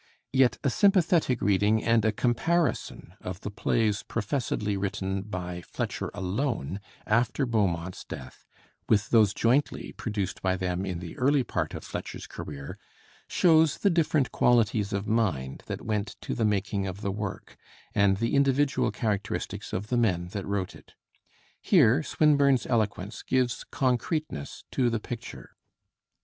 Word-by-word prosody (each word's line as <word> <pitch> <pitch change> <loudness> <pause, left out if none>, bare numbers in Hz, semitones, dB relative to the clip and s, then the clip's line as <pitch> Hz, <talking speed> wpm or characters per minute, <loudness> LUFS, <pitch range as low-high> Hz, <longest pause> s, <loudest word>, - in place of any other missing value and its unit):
Yet 130 -2 +4
a 140 - +3
sympathetic 175 - +3
reading 105 +2 +3
and 115 -1 +3
a 110 - +3
comparison 145 +10 0
of 90 +1 -6
the 105 - -5
plays 105 0 +1
professedly 110 -3 -2
written 95 0 -2
by 90 -3 -5
Fletcher - - -4
alone, 100 - -2 0.3
after 120 +5 +2
Beaumont's 90 -7 -1
death, 65 -1 -10 0.4
with 105 -1 +2
those 110 -4 +5
jointly 125 +8 +1
produced 105 -4 -4
by 95 -1 +1
them 95 +1 -2
in 90 -2 -3
the 85 -2 -7
early 140 +1 +3
part - - -2
of - - -7
Fletcher's - - -6
career, 70 -1 -8 0.5
shows 160 -3 +4
the 200 - +2
different 155 -5 +2
qualities 110 -3 +2
of 100 +1 -2
mind 95 - 0
that - - -5
went 105 -2 -2
to - - -3
the 115 - 0
making 100 -1 0
of 95 +2 -6
the 100 - -1
work, 105 0 -5 0.4
and 100 -1 +3
the 115 +3 -1
individual 140 0 +3
characteristics 105 -5 -3
of 105 +3 -3
the 125 - +1
men 90 -7 +1
that 100 +1 -5
wrote 100 -2 -2
it. - - -17 0.7
Here 120 +7 +5
Swinburne's 140 -5 +3
eloquence 105 -2 -1
gives 125 -2 0
concreteness 130 - -2
to 125 -2 +2
the 115 -1 -1
picture. 115 - -8
110 Hz, 145 wpm, -27 LUFS, 95-125 Hz, 0.7 s, those